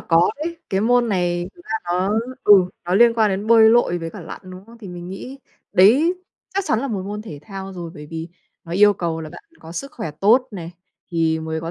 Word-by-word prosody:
có 165 +1 +3
đấy. 335 +1 -4
Cái 190 - +1
môn 240 +2 +3
này 175 -2 0
thực - - -17
ra - - -6
nó, 180 +3 0 0.3
ừ, 210 - +7 0.3
nó 180 - -1
liên 235 +3 +6
quan 220 -2 +3
đến 195 +2 -3
bơi 225 -1 +7
lội 225 -7 +3
với 165 0 -5
cả 205 - -10
lặn, 165 - -9
đúng 185 +1 -11
không? 230 0 -15
Thì 205 - -10
mình 175 0 -8
nghĩ 250 +8 -8 0.3
đấy 265 - +5 0.4
chắc 395 - 0
chắn 220 - +1
là 275 - -3
một 205 -6 -3
môn 205 +2 -5
thể 160 -10 -9
thao 195 -2 -8
rồi. 175 -3 -7
Bởi 150 0 -10
vì 165 +2 -6 0.4
nó 170 - -8
yêu 205 +3 +6
cầu 165 -3 -3
là 155 - -7
bạn - - -12 0.2
có 165 - -11
sức 275 - -6
khỏe 220 - -5
tốt 225 - +3
này, 175 -5 -7 0.4
thì 165 -1 +1
mới 160 0 -4
có 165 +1 -5
190 Hz, 240 wpm, -21 LUFS, 170-225 Hz, 0.4 s, ừ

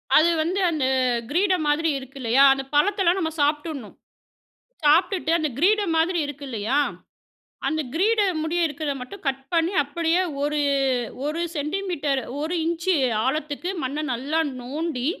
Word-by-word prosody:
அது 325 +2 +6
வந்து 360 +5 -1
அந்த 295 -5 0 0.4
கிரீடம் 360 0 +1
மாதிரி 325 +2 +2
இருக்கு 265 +1 -12
இல்லயா? 245 +4 +4
அந்த 270 0 -4
பழத்தலாம் 385 +2 +3
நம்ம 320 -2 -1
சாப்டுடணும். 295 -4 -1 0.9
சாப்பிட்டுட்டு 330 +1 +3
அந்த 310 -2 0
கிரீடம் 400 0 +3
மாதிரி 345 +2 +1
இருக்கு 290 0 -8
இல்லயா? 230 +3 -1 0.9
அந்த 315 -1 -1
கிரீடம் 390 -2 +2
முடிய 345 +2 -1
இருக்கத 295 0 -3
மட்டும் 255 +11 -9
கட் 270 0 -1
பண்ணி 335 +3 +2
அப்படியே 330 +5 0 0.2
ஒரு 295 +1 0 0.7
1 315 +3 -2 0.2
சென்டிமீட்டர், 300 -3 -1 0.2
1 320 +4 -2
இஞ்ச் 335 +2 -2 0.4
ஆழத்துக்கு 305 +5 -2
மண்ண 275 +3 -2
நல்லா 280 +7 -1 0.2
நோண்டி, 275 0 -3
315 Hz, 135 wpm, -24 LUFS, 285-345 Hz, 0.9 s, அது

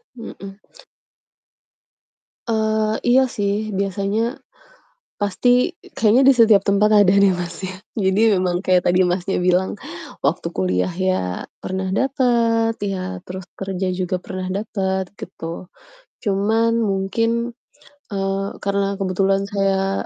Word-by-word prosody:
Mmm, 230 - -8
mhm. 195 0 -9 1.9
Eee, 220 -1 +1
iya 260 +2 +4
sih, 210 -2 -2
biasanya, 200 +5 -1 0.8
pasti 245 - +2 0.2
kayaknya 225 +4 +4
di 275 - +8
setiap 225 -4 +5
tempat 200 +1 +3 0.2
ada 185 - +4
deh, 200 - +6
Mas, 175 +1 -5
ya. 185 0 -5 0.2
Jadi 210 +2 +3
memang 180 0 0
kayak 185 -1 +4
tadi 180 +1 +4
Masnya 180 +2 -1
bilang, 180 +3 +1 0.5
waktu 165 +3 0
kuliah 90 - 0
ya 185 - -2 0.2
pernah 190 0 -3
dapet, 235 -2 +2
ya, 190 -2 -3
terus 185 0 -8
kerja 190 -1 -3
juga 185 0 -2
pernah 185 0 -6
dapet, 190 -1 -2 0.2
gitu. 170 0 -7 0.5
Cuman 220 +3 +1
mungkin, 230 +4 -1 0.6
eee, 195 0 -1
karena 200 0 0
kebetulan 195 +1 +1
saya 195 -1 0
195 Hz, 115 wpm, -21 LUFS, 185-220 Hz, 1.9 s, di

